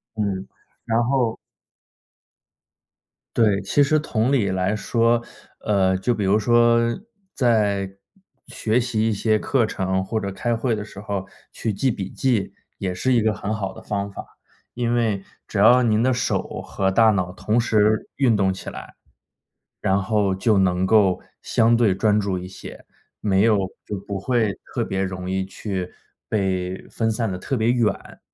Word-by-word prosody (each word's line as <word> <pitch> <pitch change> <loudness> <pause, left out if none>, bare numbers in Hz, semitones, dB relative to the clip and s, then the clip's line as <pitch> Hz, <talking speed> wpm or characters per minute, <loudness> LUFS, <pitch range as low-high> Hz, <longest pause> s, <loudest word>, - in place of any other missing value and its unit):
嗯， 100 -3 -2 0.4
然 115 +1 +2
后 125 -2 +1 2.0
对， 105 -4 +3
其 120 +9 +2
实 155 +2 +3
同 125 -4 0
理 115 -8 +2
来 95 +2 0
说， 115 +2 +1 0.4
呃， 95 -2 +2
就 95 +6 0
比 105 - -2
如 100 +3 +3
说 120 +1 +4 0.6
在 105 -6 +2 0.6
学 110 +2 0
习 115 -3 0
一 110 - +1
些 110 +1 +1
课 125 +1 +1
程， 95 -2 -1
或 110 +4 -2
者 100 -2 -4
开 120 +4 -1
会 115 +1 0
的 105 - -4
时 105 -1 -11
候， 100 -2 -4 0.2
去 110 - -3
记 125 +6 0
笔 95 -3 -5
记 120 -7 0 0.3
也 95 -2 -2
是 130 +8 0
一 120 - +4
个 110 0 +2
很 105 +1 -3
好 100 -3 -3
的 - - -11
方 100 -1 -3
法， - - -8 0.5
因 120 -1 -1
为 110 -5 0 0.2
只 105 - -3
要 125 +5 +6
您 110 -2 +2
的 130 +2 +3
手 120 0 -2
和 95 -1 -1
大 110 +3 +5
脑 90 -3 -1
同 110 +4 0
时 110 -2 +2
运 130 -5 +3
动 95 -2 +2
起 95 - -7
来， - - -10 0.9
然 95 +1 +2
后 100 -1 +1
就 105 +2 +2
能 90 -1 +2
够 100 -3 +4 0.2
相 115 +1 +3
对 115 -5 +3
专 105 +2 +2
注 100 -3 -1
一 90 +1 -7
些， 95 - -11 0.3
没 100 -2 +2
有 110 -2 +4 0.3
就 105 - -4
不 100 -1 -3
会 110 -1 0
特 - - -1
别 95 0 -2
容 95 -1 -4
易 95 0 0
去 95 -1 -5 0.4
被 95 -3 -1
分 115 -1 0
散 110 -1 -1
得 90 - -3
特 115 - -3
别 115 -2 +2
远。 120 -3 -1
105 Hz, 180 characters per minute, -22 LUFS, 95-115 Hz, 2.0 s, 要